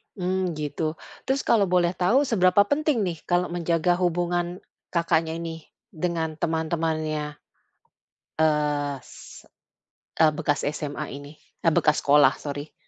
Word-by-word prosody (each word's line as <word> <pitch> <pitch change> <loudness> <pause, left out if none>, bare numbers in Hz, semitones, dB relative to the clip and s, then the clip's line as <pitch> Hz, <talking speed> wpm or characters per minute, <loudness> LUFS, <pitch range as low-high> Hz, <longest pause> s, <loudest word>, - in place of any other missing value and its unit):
Mmm, 185 -2 -1
gitu. 150 +1 -3 0.3
Terus 270 +1 +1
kalau 210 -4 +3
boleh 175 -1 +2
tahu 185 +10 +2
seberapa 200 -6 +4
penting 285 -1 +1
nih, 175 -3 -2
kalau 175 0 +1
menjaga 175 0 +1
hubungan 175 0 -1 0.3
Kakaknya, 165 -1 0
ini 165 -1 -6 0.2
dengan 160 -3 -3
teman-temannya? 155 -2 -1 1.1
Eee, 150 -2 +1
se - - -13 0.7
eee, 155 -1 +5
bekas 145 0 -1
SMA 150 0 -3
ini, 145 +2 -10 0.2
eee, 165 - +3
bekas 150 - +3
sekolah 145 -1 +5
sorry. 145 +1 -6
165 Hz, 120 wpm, -25 LUFS, 150-180 Hz, 1.1 s, eee